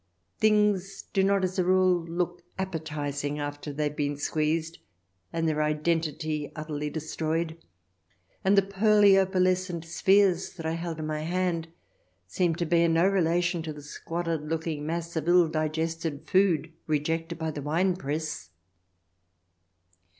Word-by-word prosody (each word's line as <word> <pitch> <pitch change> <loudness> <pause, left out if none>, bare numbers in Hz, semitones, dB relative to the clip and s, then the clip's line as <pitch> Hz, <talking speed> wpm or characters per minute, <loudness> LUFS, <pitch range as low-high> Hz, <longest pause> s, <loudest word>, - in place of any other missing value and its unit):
Things 210 -3 +2
do 195 - +3
not 195 0 +2
as 185 +1 -1
a - - +4
rule 185 -1 +3
look 175 +1 -2 0.2
appetizing 150 -5 -3
after 145 0 -4
they 150 +2 -2
have 150 0 -2
been 145 -1 -1
squeezed 155 +3 -1 0.5
and 165 -1 -1
their 155 -1 +1
identity 155 0 -1
utterly 150 -1 -4
destroyed, 160 +1 -2 0.8
and 195 +1 +4
the 195 - +6
pearly, 200 0 +5
opalescent 185 -2 +1
spheres 190 +2 +3
that 165 -4 -8
I 160 - 0
held 165 0 -4
in 155 - -4
my 155 0 -2
hand 170 0 -1 0.6
seemed 165 - 0
to 170 - -1
bear 170 0 +3
no 165 +3 +4
relation 175 -2 +1
to 160 -1 -5
the 145 -1 -11
squalid 165 +2 -3
looking 155 -1 -3
mass 170 +1 -3
of 160 0 -2
ill 175 -1 +6
digested 160 0 -2
food 175 -4 +2
rejected 160 +2 -1
by 160 -1 -2
the 145 - -6
winepress. 155 - -1
165 Hz, 140 wpm, -27 LUFS, 155-180 Hz, 0.8 s, the